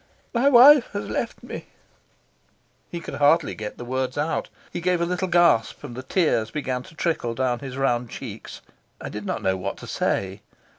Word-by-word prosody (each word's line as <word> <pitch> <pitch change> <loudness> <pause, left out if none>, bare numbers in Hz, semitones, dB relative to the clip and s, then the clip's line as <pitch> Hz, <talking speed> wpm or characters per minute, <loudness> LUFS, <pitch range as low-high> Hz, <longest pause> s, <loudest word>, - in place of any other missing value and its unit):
"My 250 +4 +4
wife 270 +1 +8
has 205 - -3
left - - -3
me." - - -8 1.2
He 170 - -5
could - - -8
hardly 145 +2 +3
get 105 -1 -7
the 120 - -7
words 130 +1 -2
out. 150 +3 -1 0.2
He 175 - -3
gave 180 0 +1
a 170 - +1
little 180 +2 -1
gasp, 175 -11 +3
and 125 -5 -7
the 130 - -5
tears 130 - +1
began 130 -3 -3
to 155 - -15
trickle 155 -9 -1
down 125 -1 0
his 135 -2 -7
round 125 -3 0
cheeks. 115 -4 -8 0.4
I - - -6
did 105 -1 -6
not - - -3
know 95 -1 +1
what 90 - -4
to - - -10
say. 95 +1 -2
135 Hz, 190 wpm, -24 LUFS, 120-175 Hz, 1.2 s, wife